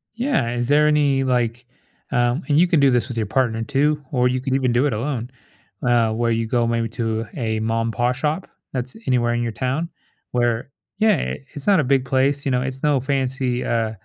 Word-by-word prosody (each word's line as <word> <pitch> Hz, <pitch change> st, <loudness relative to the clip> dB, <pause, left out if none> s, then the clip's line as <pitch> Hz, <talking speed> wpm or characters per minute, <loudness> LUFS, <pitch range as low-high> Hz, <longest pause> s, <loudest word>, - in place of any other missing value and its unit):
Yeah, 235 Hz, -, 0 dB
is 120 Hz, 0 st, -2 dB
there 150 Hz, +1 st, +4 dB
any, 145 Hz, -3 st, +2 dB
like, 120 Hz, -1 st, 0 dB, 0.5 s
um 120 Hz, +3 st, +1 dB
and 145 Hz, +1 st, +3 dB
you 180 Hz, -, +6 dB
can 170 Hz, -4 st, +2 dB
do 140 Hz, -1 st, +5 dB
this 120 Hz, -1 st, +1 dB
with 120 Hz, -, -6 dB
your 110 Hz, -, 0 dB
partner 115 Hz, 0 st, 0 dB
too, 145 Hz, +3 st, +1 dB
or 125 Hz, -1 st, +3 dB
you 125 Hz, 0 st, -1 dB
can 130 Hz, 0 st, -2 dB
even 130 Hz, -3 st, +1 dB
do 125 Hz, +4 st, +2 dB
it 140 Hz, -, 0 dB
alone, 125 Hz, +1 st, -3 dB, 0.6 s
uh, 120 Hz, -2 st, +3 dB
where 115 Hz, +1 st, 0 dB
you 115 Hz, 0 st, 0 dB
go 120 Hz, 0 st, +1 dB
maybe 115 Hz, 0 st, 0 dB
to 115 Hz, 0 st, -2 dB
a 110 Hz, -4 st, -1 dB
ma 115 Hz, +1 st, 0 dB
and 115 Hz, -, -2 dB
pa 120 Hz, +2 st, +1 dB
shop, 150 Hz, +7 st, -2 dB, 0.2 s
that's 125 Hz, -, -4 dB
anywhere 120 Hz, -2 st, +2 dB
in 120 Hz, -, 0 dB
your 115 Hz, -1 st, -2 dB
town, 135 Hz, +8 st, -2 dB, 0.4 s
where 120 Hz, +1 st, 0 dB, 0.3 s
Yeah, 215 Hz, -8 st, +2 dB, 0.2 s
it's 145 Hz, -, -7 dB
not 200 Hz, -3 st, +5 dB
a 150 Hz, -, 0 dB
big 135 Hz, 0 st, +2 dB
place, 135 Hz, +2 st, +1 dB
you 140 Hz, -, 0 dB
know, 125 Hz, -1 st, +1 dB
it's 135 Hz, 0 st, -4 dB
no 145 Hz, -2 st, +3 dB
fancy, 130 Hz, -2 st, -1 dB
uh, 115 Hz, -2 st, 0 dB
125 Hz, 220 wpm, -21 LUFS, 120-140 Hz, 0.6 s, you